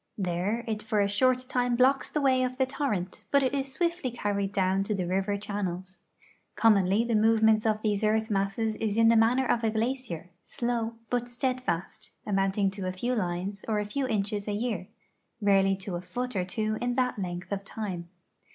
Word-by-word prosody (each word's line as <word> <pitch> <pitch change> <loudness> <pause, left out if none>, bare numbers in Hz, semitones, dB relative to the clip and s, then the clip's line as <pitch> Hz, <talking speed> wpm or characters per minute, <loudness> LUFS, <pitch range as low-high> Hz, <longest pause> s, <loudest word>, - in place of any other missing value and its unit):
There 195 +5 -1
it 215 -1 -2
for 215 -1 0
a 200 - +3
short 255 +5 +2
time 245 -2 +1
blocks 265 +3 +3
the 300 - -1
yvay 260 -2 +3
of 255 0 -2
the 265 - +3
torrent, 235 -10 -3
but 280 -1 +4
it 260 0 +1
is 275 -1 -1
swiftly 340 -1 -1
carried 205 -4 -2
doyvn 190 -1 +1
to 210 - -1
the 185 - -1
riy'er 195 +3 0
channels. 190 -3 -4 0.6
Commonly' 210 -1 +4
the 235 0 -1
moy'ements 220 0 +4
of 215 0 0
these 210 -1 0
earth 220 +1 +1
masses 200 +3 0
is 220 -1 -1
in 225 0 +6
the 230 - +5
manner 235 +4 +4
of 235 -1 +1
a 225 - +3
glacier, 220 -6 -3
sloyv, 235 -1 -2 0.2
but 245 0 0
steadfast, 240 -6 -2 0.2
amount 195 -1 0
ing 195 -2 +2
to 195 -1 -5
a - - 0
few 240 +7 -2
lines 190 -1 -2
or 220 -2 +1
a 210 - -1
few 265 +6 -2
inches 205 -2 -1
a 210 - -1
year; 210 -4 -2 0.5
rarely 195 -2 +4
to 190 0 -7
a 175 - -4
foot 250 +5 -4
or 185 -2 0
two 215 +2 -2
in 245 0 0
that 250 -4 0
length 180 0 -5
of 200 0 -2
time. 190 -5 -5
215 Hz, 200 wpm, -28 LUFS, 195-245 Hz, 0.6 s, in